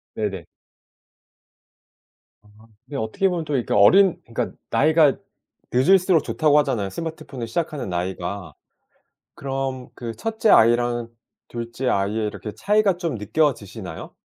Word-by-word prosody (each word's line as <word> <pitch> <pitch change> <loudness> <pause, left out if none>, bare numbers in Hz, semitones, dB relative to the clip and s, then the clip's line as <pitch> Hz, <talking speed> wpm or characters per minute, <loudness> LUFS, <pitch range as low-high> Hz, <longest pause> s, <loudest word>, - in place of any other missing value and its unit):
네네. 95 -6 -3 2.0
아 - - -23 0.4
근데 140 +1 -6
어떻게 125 - 0
보면 170 -3 -3
또 150 - -2
이렇게 125 - -1
어린 185 - +5
그니깐 115 - -4
나이가 155 -1 +4 0.6
늦을수록 175 +5 +4
좋다고 150 -2 +2
하잖아요 125 -9 -1
스마트폰을 155 - -6
시작하는 155 - -3
나이가. 90 -1 -4 0.8
그럼 135 -2 -4
그 115 -2 -6
첫째 220 - 0
아이랑 120 +1 +4 0.4
2 120 0 -6
째 130 +1 -2
아이의 105 +2 0
이렇게 105 0 -7
차이가 205 - +2
좀 170 -7 -3
느껴지시나요? 110 0 -2
130 Hz, 295 characters per minute, -22 LUFS, 110-160 Hz, 2.0 s, 어린